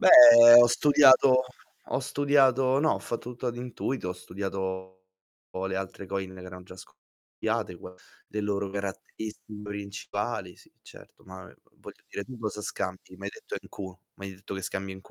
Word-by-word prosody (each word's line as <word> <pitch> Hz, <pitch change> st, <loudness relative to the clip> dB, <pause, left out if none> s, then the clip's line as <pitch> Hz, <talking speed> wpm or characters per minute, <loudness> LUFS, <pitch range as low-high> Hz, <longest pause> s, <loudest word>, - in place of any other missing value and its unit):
Beh, -, -, +4 dB, 0.5 s
ho 120 Hz, -, +7 dB
studiato 130 Hz, 0 st, +5 dB, 0.4 s
ho -, -, -1 dB
studiato 135 Hz, -1 st, +2 dB
no, 155 Hz, +1 st, +2 dB
ho -, -, -3 dB
fatto 120 Hz, +1 st, -6 dB
tutto 125 Hz, +1 st, -7 dB
ad 120 Hz, -, -5 dB
intuito, 125 Hz, -3 st, -4 dB
ho -, -, -2 dB
studiato 95 Hz, 0 st, -6 dB, 0.7 s
le 95 Hz, 0 st, -3 dB
altre 95 Hz, 0 st, -6 dB
coin 95 Hz, 0 st, -5 dB
che 95 Hz, -, -11 dB
erano 90 Hz, 0 st, -10 dB
già 90 Hz, 0 st, -13 dB
scoppiate 85 Hz, +2 st, -6 dB
qua 90 Hz, +2 st, -12 dB, 0.3 s
le 105 Hz, -, -4 dB
loro 100 Hz, -1 st, -2 dB
caratteristiche 105 Hz, +2 st, -7 dB
principali, 100 Hz, -1 st, -5 dB
sì, -, -, -22 dB
certo. -, -, -17 dB
Ma, 95 Hz, 0 st, -11 dB
ehm, 95 Hz, -, -15 dB
v -, -, -35 dB
voglio -, -, -13 dB
dire, 100 Hz, -, -6 dB
tu 130 Hz, +1 st, -11 dB
cosa 105 Hz, -2 st, -5 dB
scambi? 95 Hz, -1 st, -6 dB
Mi 100 Hz, -, -12 dB
hai 100 Hz, -, -3 dB
detto -, -, -8 dB
NQ -, -, -17 dB, 0.4 s
mi 100 Hz, -, -9 dB
hai 95 Hz, -, -8 dB
detto 100 Hz, +1 st, -9 dB
che 95 Hz, -, -6 dB
scambi 95 Hz, 0 st, -5 dB
NQ. 95 Hz, -, -16 dB
100 Hz, 180 wpm, -27 LUFS, 95-120 Hz, 0.7 s, ho